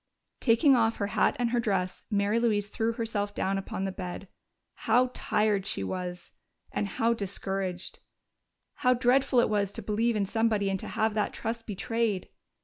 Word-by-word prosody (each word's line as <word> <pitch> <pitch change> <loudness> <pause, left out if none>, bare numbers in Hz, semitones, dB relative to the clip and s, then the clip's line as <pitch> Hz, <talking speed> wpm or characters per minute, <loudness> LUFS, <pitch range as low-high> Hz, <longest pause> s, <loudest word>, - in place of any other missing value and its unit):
Taking 270 +4 +5
off 230 -1 +2
her 200 - -1
hat - - +3
and 240 -1 0
her 240 - +2
dress, 190 -5 -1
Mary 205 +1 +2
Louise 210 -3 +1
threw 225 +2 -1
herself 210 -3 -2
down 195 +1 0
upon 195 0 -4
the 195 - -2
bed. 185 +1 -6 0.6
How 250 +3 +4
tired 210 -2 +1
she 95 - -2
was! 180 - -5 0.4
And 205 - -1
how 230 +4 +1
discouraged! 195 -3 -3 0.8
How 250 -3 +3
dreadful 250 +1 +3
it - - +2
was 205 -2 0
to 225 - -6
believe 220 +3 +1
in 205 -2 +1
somebody 215 -1 +1
and 190 - -1
to - - -6
have 220 -2 0
that 210 -1 0
trust 225 0 -4
betrayed! 220 -1 -1
210 Hz, 170 wpm, -28 LUFS, 195-230 Hz, 0.8 s, Taking